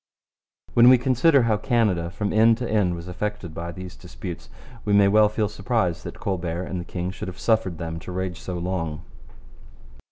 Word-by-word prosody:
When 120 +1 +7
we 130 - +8
consider 130 +3 +3
how 110 -2 +2
Canada 105 -8 +1
from 100 +4 -3
end 110 +1 +5
to 125 -1 -3
end 100 -6 +1
was 85 +1 -8
affected 90 -2 -4
by 85 +1 -5
these 90 +1 -9
disputes, 80 +9 -8 0.3
we 105 - 0
may 100 -1 +6
well 105 +1 +5
feel 105 0 0
surprise 105 -7 -1
that - - -9
Colbert 90 -4 -2
and 90 -1 -4
the - - -9
king 90 0 -4
should 95 - -7
have 95 - -7
suffered 110 -7 +1
them 80 0 -5
to 90 - -9
rage 95 -1 -3
so 90 -1 -5
long. 85 -3 -3
95 Hz, 190 wpm, -24 LUFS, 85-110 Hz, 0.3 s, we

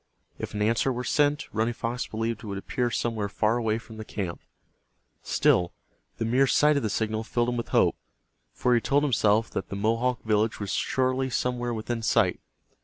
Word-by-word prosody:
If - - -5
an 105 - 0
answer 115 +4 +2
were 125 0 -3
sent, 145 +2 +2
Running 115 +2 0
Fox 120 0 -3
believed 115 +1 -3
it - - -7
would 100 -1 -4
appear 120 +5 -1
somewhere 115 -3 -1
far 110 +3 +1
away 110 -2 0
from 115 -1 -11
the 110 - -6
camp. 95 -5 -5 0.8
Still, 90 -1 +2 0.4
the 115 - -1
mere 130 +4 +3
sight 150 +3 +4
of 140 - +1
the 110 - -1
signal 110 +1 -1
filled 120 +1 0
him 120 - -1
with 120 - -3
hope, - - +3 0.6
for 125 - +1
he 120 - +3
told 140 +6 +2
himself 110 -5 +2
that - - -4
the - - -4
Mohawk 115 +3 0
village 110 0 +1
was 100 -2 -3
surely 130 0 0
somewhere 120 -1 -1
within 115 +1 -3
sight. - - +2
115 Hz, 190 wpm, -27 LUFS, 110-125 Hz, 0.8 s, sight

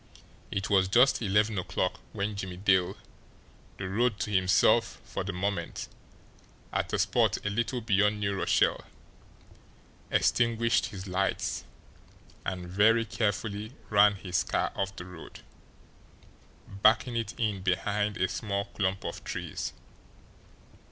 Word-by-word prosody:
It 100 +1 -2
was 95 -2 +3
just 125 +8 +4
eleven 105 0 +2
o'clock 90 - -2
when 100 +1 -2
Jimmie 95 -2 -5
Dale, 95 -2 +2 0.8
the 95 - -4
road 110 +3 +1
to 105 - -2
himself 95 -2 +3
for - - -4
the 100 - -3
moment 90 -1 -3 0.9
at - - -1
a - - +1
spot - - +2
a 105 - 0
little 120 +3 -1
beyond 105 -1 +2
New 100 -1 0
Rochelle, 100 - +2 1.3
extinguished 115 0 +2
his 100 -5 -8
lights, 90 -1 -1 0.8
and 90 -2 -4
very 110 +5 +4
carefully 105 +1 -2 0.2
ran 105 0 +6
his 90 -2 -1
car - - -1
off 100 0 -2
the 90 - -8
road, 90 -3 -11 1.3
backing 110 +4 +3
it 115 -2 -3
in 105 -5 0
behind 100 +2 0
a 95 - +2
small 100 +1 -2
clump 95 -2 -2
of - - -5
trees. - - -4
100 Hz, 125 wpm, -29 LUFS, 95-110 Hz, 1.3 s, ran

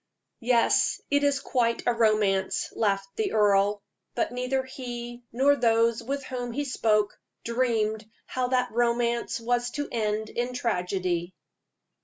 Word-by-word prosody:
"Yes, 235 0 +3
it 285 0 +3
is 285 -1 +2
quite 235 -2 0
a 245 - +3
romance," 215 -4 +1
laughed 195 -3 -1
the 435 -3 -1
earl. 205 -1 +3 0.3
But 240 - 0
neither 250 +2 -1
he 240 -2 -7
nor 275 +4 +4
those 230 -2 +2
with 275 +3 -3
whom 245 -2 -4
he 290 +3 -2
spoke 215 -5 +1 0.2
dreamed 225 -3 0 0.2
how 255 -1 -2
that 250 -1 +1
romance 235 0 0
was 240 +1 0
to 290 0 -2
end 215 -1 -1
in 240 +1 -1
a - - -8
tragedy. 180 -6 -1
235 Hz, 140 wpm, -27 LUFS, 215-250 Hz, 0.3 s, nor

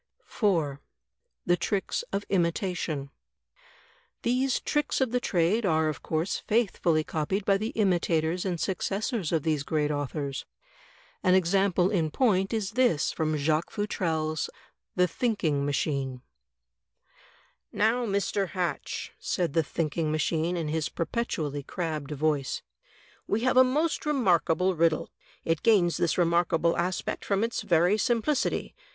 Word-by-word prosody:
4, 160 - 0 0.6
The 175 - +4
Tricks 190 +3 -1
of 200 +1 -2
Imitation 170 -5 -1 1.1
These 255 +2 +1
tricks 295 -1 0
of 260 -4 +1
the 250 - +1
trade 190 +2 +1
are 160 -4 +2
of 155 - -5
course 160 +4 -1
faithfully 180 -8 +1
copied 175 +7 -2
by 195 -1 +4
the 215 +2 -2
imitators 175 -4 +1
and 180 -3 -2
successors 195 - -2
of 160 -4 +1
these 155 -3 +1
great 150 0 0
authors. 145 -1 -3 0.8
An 185 0 +4
example 190 0 +2
in 165 -6 +1
point 195 - +2
is 220 -3 -1
this 240 - +2
from 155 -1 -1
Jacques 155 +3 +1
Futrelle's 160 - -1 0.5
"The 180 0 +4
Thinking 165 - 0
Machine;'' 135 -3 -2 1.5
"Now, 225 +4 +2
Mr. 200 0 0
Hatch," 175 -4 -3
said 175 -5 -1
The 165 - +4
Thinking 155 0 -2
Machine 160 +3 0
in 160 -3 -2
his 155 0 -1
perpetu 165 0 -2
ally 145 0 -4
crabbed 155 -2 -4
voice, 150 -2 -1 0.6
"we 215 - 0
have 255 +1 +2
a 255 - +8
most 300 +5 0
remarkable 185 - +2
riddle. 165 -1 +1 0.3
It 165 -1 0
gains 180 -8 +4
this 175 -2 +1
remarkable 170 -1 +2
aspect 175 +1 -2
from 200 +1 0
its 230 0 -1
very 175 +5 +3
simplicity. 245 +5 0
175 Hz, 135 wpm, -28 LUFS, 155-205 Hz, 1.5 s, a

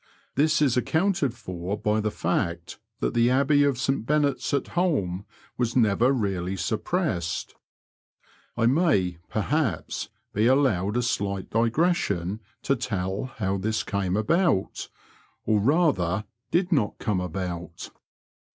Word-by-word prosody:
This 150 +2 +3
is 130 -4 +3
accounted 160 -1 +1
for 95 -3 -5
by 105 +1 +1
the 105 - 0
fact 85 -2 -2 0.2
that - - 0
the 120 +1 +3
Abbey 140 +3 +4
of 140 -3 +2
St 130 0 0
Benet's 145 +2 +1
at 140 -2 0
Holm 105 - 0 0.3
was 120 -2 0
neyer 115 +1 +4
really 95 -7 -1
suppressed. 95 - -2 1.0
I 115 - +2
may, 115 - +2
per 110 - -1
haps, 135 - -1 0.2
be 110 +3 +2
allowed 120 -6 +2
a 125 - +1
slight 100 -5 -2
digression 115 - +1 0.2
to 140 - +2
tell 100 -4 -2
how 100 -7 -2
this 110 +3 -1
came 100 -1 -1
about 145 - +1 0.3
— - - -35
or, 110 -1 +3
rather, 110 - +2 0.2
did 180 +2 +1
not 130 -11 +1
come 105 -4 -1
about. 90 -1 -5
110 Hz, 135 wpm, -26 LUFS, 95-140 Hz, 1.0 s, Abbey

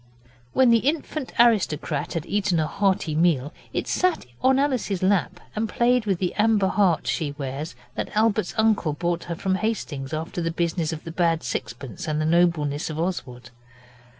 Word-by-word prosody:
When 260 -2 +5
the 230 - +6
infant 290 +1 -2
aristocrat 180 -10 +2
had 165 -3 -3
eaten 200 -4 +1
a 155 - +2
hearty 185 -1 0
meal 155 -3 +2 0.2
it - - -2
sat 365 - +1 0.2
on 265 0 +4
Alice's 255 -9 0
lap 190 -2 +1 0.2
and 215 +1 -1
played 240 0 +2
with 195 -3 +2
the 180 0 -1
amber 210 -3 +3
heart 190 -6 +2
she 150 -4 -1
wears 140 +1 -5 0.2
that - - -4
Albert's 215 -1 +2
uncle 220 -8 +2
brought 170 +2 -2
her 170 - -4
from 190 +3 -1
Hastings 185 -10 -2
after 160 +3 -3
the 165 - 0
business 165 -1 -1
of 160 -1 -6
the 165 - -7
bad 165 -2 +1
sixpence 120 0 -5
and 155 -1 0
the 155 - 0
nobleness 160 -3 +2
of 155 0 -5
Oswald. 130 -10 -4
175 Hz, 175 wpm, -24 LUFS, 155-215 Hz, 0.2 s, the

